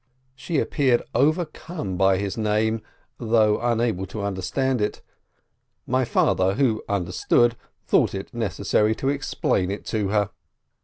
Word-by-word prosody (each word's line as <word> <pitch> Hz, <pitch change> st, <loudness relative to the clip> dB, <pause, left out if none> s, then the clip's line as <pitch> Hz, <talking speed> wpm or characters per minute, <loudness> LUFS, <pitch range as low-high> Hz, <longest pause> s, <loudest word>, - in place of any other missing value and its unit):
She 135 Hz, +5 st, -3 dB
appeared 130 Hz, -5 st, +2 dB
overcome 155 Hz, -, -1 dB
by 95 Hz, +1 st, +3 dB
his 100 Hz, 0 st, -3 dB
name, 110 Hz, 0 st, 0 dB, 0.4 s
although 110 Hz, -2 st, +2 dB
unable 115 Hz, -5 st, 0 dB
to 105 Hz, -, -6 dB
understand 105 Hz, +6 st, -1 dB
it. 105 Hz, -, -2 dB, 0.8 s
My 130 Hz, +1 st, +1 dB
father, 95 Hz, -4 st, +2 dB
who 115 Hz, -4 st, +1 dB
understood, 100 Hz, +5 st, +2 dB, 0.3 s
thought -, -, +2 dB
it -, -, -7 dB
necessary 110 Hz, +1 st, +1 dB
to 135 Hz, -, -1 dB
explain 140 Hz, -9 st, 0 dB
it 100 Hz, -, -5 dB
to 105 Hz, -3 st, -1 dB
her. 105 Hz, 0 st, +1 dB
110 Hz, 125 wpm, -24 LUFS, 100-130 Hz, 0.8 s, by